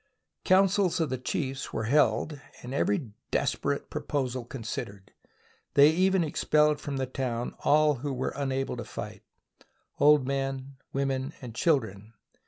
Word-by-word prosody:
Councils 190 -1 +3
of 160 -4 0
the 130 - -2
chiefs 135 +1 -3
were - - -2
held 135 +3 +2 0.2
and 125 +2 -6
every 165 - 0 0.2
des - - +1
perate - - -3
proposal 130 -3 -2
considered. 110 -5 -6 0.6
They 145 +2 +8
even 185 +2 +3
expelled 150 -1 +2
from 140 -2 -4
the 135 - 0
town 125 -2 -3
all 150 0 +4
who 140 +4 -4
were 130 -1 -2
unable 135 -2 -2
to 120 - -4
fight - - -7 0.4
— - - -41
old 145 -2 +6
men, 135 0 -3
women, 135 +1 -1
and 125 -5 -8
children. 110 - 0
135 Hz, 145 wpm, -28 LUFS, 125-150 Hz, 0.6 s, They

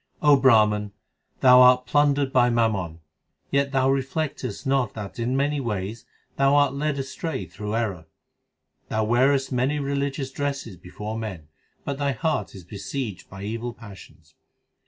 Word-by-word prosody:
O 150 -1 +6
Brahman, 105 -6 +3 0.5
thou 125 -1 +8
art 125 0 +6
plundered 145 -2 +2
by 125 -1 +4
mammon, 100 -9 0 0.5
yet 140 0 +1
thou 135 -1 +2
reflectest 135 -3 -2
not 135 -5 0
That 105 0 -7
in 125 +3 0
many 145 +1 0
ways 110 -2 -4 0.3
thou 135 +1 +4
art 145 -2 +4
led 145 +1 -1
astray 135 - -4
through 105 +5 -5
error. 95 -8 -2 0.8
Thou 110 0 0
wearest 130 +5 +2
many 130 +4 0
religious 140 -1 -2
dresses 140 -6 -4
before 105 +6 -7
men, 95 -9 -7 0.4
But 140 0 -3
thy 140 -1 0
heart 130 - -2
is 95 - -10
besieged 100 +3 -6
by 100 0 -9
evil 115 +3 -4
passions. 100 -4 -14
125 Hz, 145 wpm, -24 LUFS, 105-140 Hz, 0.8 s, thou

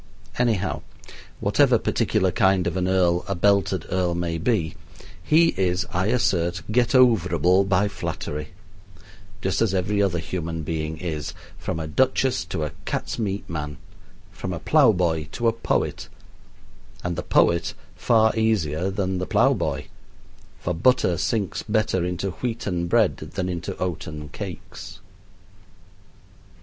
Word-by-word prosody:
Anyhow, 110 -6 +1 0.6
whatever - - +4
particular 95 -1 +1
kind 95 -4 +3
of 90 0 -1
an 90 -1 0
earl 90 -2 +2
a 100 - -1
belted 100 -2 +2
earl 90 -2 +1
may 85 -1 -2
be, 85 -5 0 0.5
he 165 - +5
is, 90 -1 0
I 95 +2 +1
assert, 90 -7 +1
get 120 +3 +2
overable 95 - +4
by 100 +2 +3
flattery; 75 -6 -5 1.0
just 95 -1 0
as 105 -4 +2
every 100 +3 +1
other 95 -3 +1
human 80 -1 -4
being 80 0 -3
is, 80 -3 -4 0.3
from 80 - -3
a 80 - -3
duchess 130 +8 +1
to 85 -3 -3
a 75 - -3
cat's - - -3
meat 100 -2 -2
man, 75 -3 -5 0.5
from 95 - -5
a 85 - -4
plow 140 - +5
boy 85 -5 0
to 120 - 0
a 115 - +3
poet 115 - -2 0.9
and 90 -1 -2
the 90 - -2
poet 85 -1 +2 0.2
far 110 -2 +3
easier 95 -7 +1
than 95 -1 -1
the 90 - -3
plowboy, - - +2 0.8
for 90 - -2
butter 90 0 +3
sinks 100 +4 -1
better 105 -5 0
into 90 +2 -2
wheaten 105 -8 -2
bread 110 +1 +3
than 90 +4 -4
into 85 -2 -4
oaten 80 -4 -4
cakes. 95 +2 -8
90 Hz, 135 wpm, -24 LUFS, 85-105 Hz, 1.0 s, he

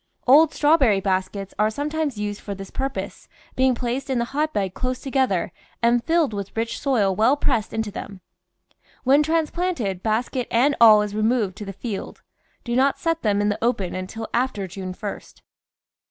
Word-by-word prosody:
Old 295 +5 +6
strawberry 280 -9 +3
baskets 190 +1 -2
are 215 0 +3
sometimes 290 +1 -2
used 205 0 -4
for 200 - -5
this 195 0 -9
purpose, 270 +1 -4 0.3
being 260 -1 +3
placed 250 +3 -3
in 260 - 0
the 235 - 0
hotbed 275 -11 -1
close 255 +4 -2
together 260 - 0 0.3
and 235 0 +2
filled 325 -6 +1
with 200 +1 -6
rich 230 0 -2
soil 215 -9 +1
well 230 +8 +3
pressed 235 -7 0
into 220 -2 -3
them; 200 -1 -8 0.8
when 275 +3 +5
transplanted, 315 - -1
basket 235 +4 -1
and 270 +5 +3
all 215 -2 +8
is 205 -1 -5
removed 215 -2 +1
to 210 - -7
the 195 - -5
field. 200 +1 -6 0.4
Do 240 0 -2
not 270 +2 +3
set 330 -1 -1
them 205 -2 +1
in 205 - +1
the 205 +2 -3
open 215 -6 0
until 190 +4 -5
after 240 -5 0
June 185 0 -7
1st. 205 0 -8
230 Hz, 170 wpm, -23 LUFS, 205-270 Hz, 0.8 s, all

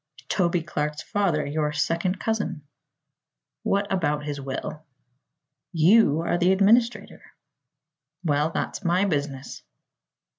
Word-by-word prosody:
"Toby 175 -3 +1
Clark's 150 -1 -3
father; 185 -7 0
your 150 +1 -1
second 170 +5 0
cousin." 210 -8 -2 1.0
"What 200 +1 +1
about 150 -5 0
his 145 -2 -4
will?" 135 +3 -5 0.9
"You 165 -1 +5
are 170 +1 0
the 180 +1 +4
administrator." 225 +5 +2 1.0
"Well, 150 -1 +1
that's 170 - -4
my 180 +2 +2
business." 140 -6 -3
165 Hz, 105 wpm, -25 LUFS, 150-190 Hz, 1.0 s, You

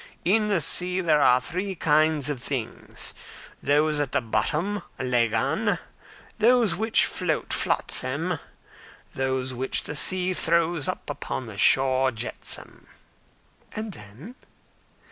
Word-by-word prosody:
In 210 +4 +2
the 200 -4 +1
sea 180 +5 +3
there 155 -5 +2
are 125 -2 +5
three 185 +7 -4
kinds 155 -2 +2
of 145 -4 -4
things: 125 -4 -6 0.5
those 150 +1 +1
at 145 -3 -2
the - - +2
bottom, 150 - -1 0.2
lagan; 120 -3 0 0.6
those 230 -3 +4
which 220 +6 +2
float, 180 -4 -2
flotsam; 155 +7 0 0.7
those 130 -1 -2
which 130 +2 -1
the 150 - -4
sea 185 +4 +5
throws 170 -3 +1
up - - -6
on - - -3
the - - -9
shore, 130 0 +4
jetsam." 115 0 -5 0.9
"And 220 0 -5
then?" 115 - -12
155 Hz, 120 wpm, -25 LUFS, 130-185 Hz, 0.9 s, are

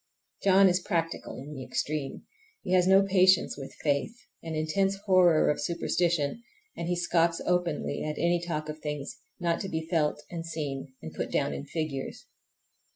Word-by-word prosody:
John 195 0 +6
is 180 0 +3
practical 165 -2 -2
in 145 +3 -8
the 135 -2 -6
extreme. 145 +1 -3 0.4
He - - -4
has 180 -1 +4
no 195 +1 +6
patience 185 -1 +4
with 135 -1 -9
faith, 145 - 0 0.2
an 165 -1 -5
intense 190 +6 +1
horror 180 -5 +5
of 150 - -3
superstition, 170 +2 0 0.3
and 170 - -4
he 175 - +1
scoffs 170 -1 +2
openly 175 -5 0
at 150 0 -3
any 170 0 +2
talk 155 -3 -3
of 155 0 -6
things 150 -2 -5 0.2
not 170 -1 0
to 195 - -4
be 160 -1 -3
felt 150 -3 +1
and 170 -1 -4
seen 145 -5 -5
and 80 - -7
put - - -3
down - - +1
in 70 - -5
figures. 155 - -4
165 Hz, 170 wpm, -28 LUFS, 150-180 Hz, 0.4 s, John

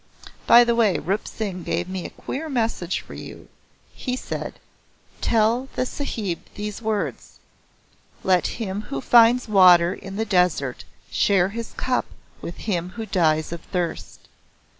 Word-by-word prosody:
By 240 +1 +9
the 235 0 +2
way 225 -5 +3
Rup 195 +4 -2
Singh 195 -5 -4
gave 170 +1 -2
me 185 -1 -4
a - - -11
queer 315 +4 -6
message 225 - -1
for - - -13
you. - - -10 0.4
He 250 -2 -3
said; - - -5 0.7
'Tell 230 +3 +2
the 255 - 0
Sahib 220 - -3 0.2
these 210 +1 -5
words 215 -2 -3 0.9
"Let 185 -2 +3
him 205 -3 -3
who 135 - -3
finds 235 - +5
water 180 -4 +6
in 195 0 -9
the 220 +2 -1
desert 180 - +1 0.3
share 190 -2 +3
his 230 +2 -6
cup 255 -1 0 0.3
with 170 - -7
him 180 -3 -2
who 225 -1 -4
dies 160 -6 +1
of 170 -1 -5
thirst." 175 -3 -4
200 Hz, 145 wpm, -23 LUFS, 180-230 Hz, 0.9 s, By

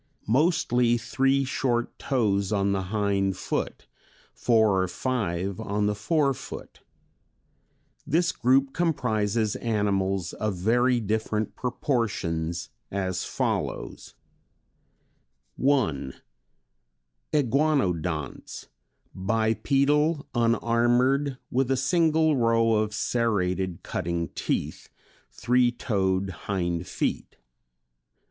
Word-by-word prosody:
Mostly 125 - +2
three 135 +3 +1
short 120 -2 -1
toes 100 -6 0
on 100 -1 +1
the 95 -1 0
hind 100 -3 0
foot, - - -3 0.5
four 110 - +3
or 95 - 0
five 95 -5 -2
on 105 +1 -1
the 105 - +1
fore 140 +7 +1
foot. - - -9 1.3
This 170 +3 +2
group 135 +2 +2
comprises 110 -10 0
animals 100 -5 0
of 105 -2 -2
very 120 +7 +2
different 110 0 -2
proportions 95 - -2 0.2
as 95 -2 -2
follows: - - -3 1.4
1. 120 - +1 1.2
Iguanodonts. 100 - 0 0.4
Bipedal, 140 - +1
unarmored, 120 +4 +2
with 130 0 +1
a 135 - +2
single 160 +2 +3
row 115 -1 +3
of 105 -1 0
serrated 95 -7 -1
cutting 85 -1 -2
teeth, - - -3 0.4
three 125 +2 +2
toed 95 -5 -1 0.2
hind 85 -2 -1
feet. - - -3
110 Hz, 85 wpm, -26 LUFS, 95-130 Hz, 1.4 s, four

